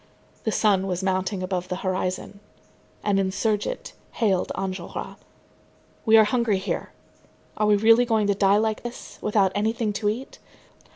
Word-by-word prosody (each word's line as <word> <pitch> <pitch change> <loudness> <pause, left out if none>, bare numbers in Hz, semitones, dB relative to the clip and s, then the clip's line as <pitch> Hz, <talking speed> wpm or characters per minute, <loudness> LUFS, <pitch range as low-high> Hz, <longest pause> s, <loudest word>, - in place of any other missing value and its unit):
The 220 - +1
sun 195 -3 +2
was 180 0 -2
mounting 190 0 -1
above 180 -1 -2
the 180 - -3
horizon. 185 +1 -2 0.6
An 200 -2 +2
insurgent 210 - -1 0.2
hailed 195 -5 +1
Enjolras. 185 -2 -5 0.9
"We 220 0 +7
are 220 - +8
hungry 220 -1 +1
here. 190 +2 -3 0.6
Are 210 - +1
we 210 - +5
really 225 +4 +5
going 220 -3 +2
to 200 - +2
die 195 0 +3
like 215 0 0
this, 240 0 -9
without 205 -3 +2
anything 220 +1 0
to 205 +1 0
eat?" 240 +6 -5
205 Hz, 150 wpm, -24 LUFS, 190-220 Hz, 0.9 s, are